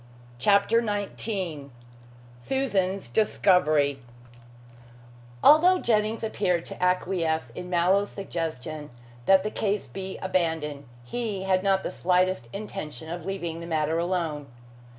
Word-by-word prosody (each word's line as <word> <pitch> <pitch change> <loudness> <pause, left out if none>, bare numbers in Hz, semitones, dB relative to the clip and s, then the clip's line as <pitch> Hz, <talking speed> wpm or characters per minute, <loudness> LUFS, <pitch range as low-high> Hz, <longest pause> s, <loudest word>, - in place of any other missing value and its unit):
CHAPTER 200 - +4
XIX 200 -7 -3 0.7
SUSAN'S 195 - -1
DISCOVERY 155 -9 +3 1.4
Although 350 +5 +7
Jennings 220 -5 0
appeared 185 -6 0
to - - -6
acquiesce 170 -7 0
in 180 +9 -7
Mallow's 185 +3 +2
suggestion 155 -5 -5 0.4
that 190 -1 +6
the 215 - -2
case 205 -1 -1
should - - -16
be 190 -1 -5
abandoned, 160 -6 -1 0.2
he 210 - -3
had 190 -1 +2
not 195 0 +2
the - - -3
slightest 180 -7 +1
intention 165 -6 -6
of 175 0 -6
leaving 175 -4 -3
the 170 - -7
matter 160 0 0
alone. 170 -5 -2
185 Hz, 115 wpm, -26 LUFS, 160-200 Hz, 1.4 s, Although